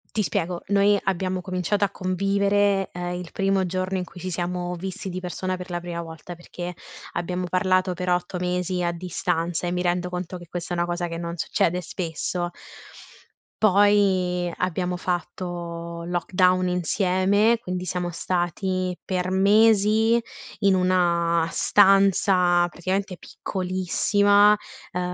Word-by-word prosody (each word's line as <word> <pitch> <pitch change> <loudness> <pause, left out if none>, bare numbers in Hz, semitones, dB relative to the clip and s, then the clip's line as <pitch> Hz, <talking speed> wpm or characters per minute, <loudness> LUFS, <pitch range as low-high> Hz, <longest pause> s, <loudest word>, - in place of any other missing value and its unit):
Ti 215 - +2
spiego: 175 -2 -2
noi 200 +1 +4
abbiamo 185 -1 -1
cominciato 185 +3 -1
a - - -3
convivere, 200 +1 +1
ehm, 175 0 -4
il 180 -2 -7
primo 195 -1 +1
giorno 185 +1 -2
in 180 - -2
cui 180 - -12
ci 185 - -4
siamo 180 0 -3
visti 190 +2 -6
di 185 +1 -4
persona, 185 +1 -3
per 180 0 -8
la 175 - -2
prima 170 -1 -5
volta, 165 +2 -9
perché 175 0 -7 0.4
abbiamo 180 +1 -2
parlato 185 0 +2
per 180 0 -3
8 180 +1 -1
mesi 180 0 -1
a 175 - +1
distanza, 175 -1 -2
e 175 - -1
mi 180 0 -1
rendo 180 0 0
conto 180 0 -5
che 175 -1 -12
questa 175 0 -4
è - - -4
una 175 - +1
cosa 175 0 -2
che 165 0 -5
non 170 0 -4
succede 180 +3 0
spesso. 175 +1 -3 1.1
Poi, 190 -3 +3
abbiamo 180 0 -1
fatto 170 -1 -4
lockdown 180 +1 +2
insieme, 190 +5 +2
quindi, 180 -2 -4
siamo 180 0 -2
stati 185 +2 -1
per 185 -1 -1
mesi 215 +3 +4 0.4
in 195 -2 +4
una 170 -2 +2
stanza, 190 -3 +4
praticamente, 185 +2 -3
piccolissima, 200 +2 +2 0.4
ehm, 180 - -3
180 Hz, 140 wpm, -24 LUFS, 175-190 Hz, 1.1 s, noi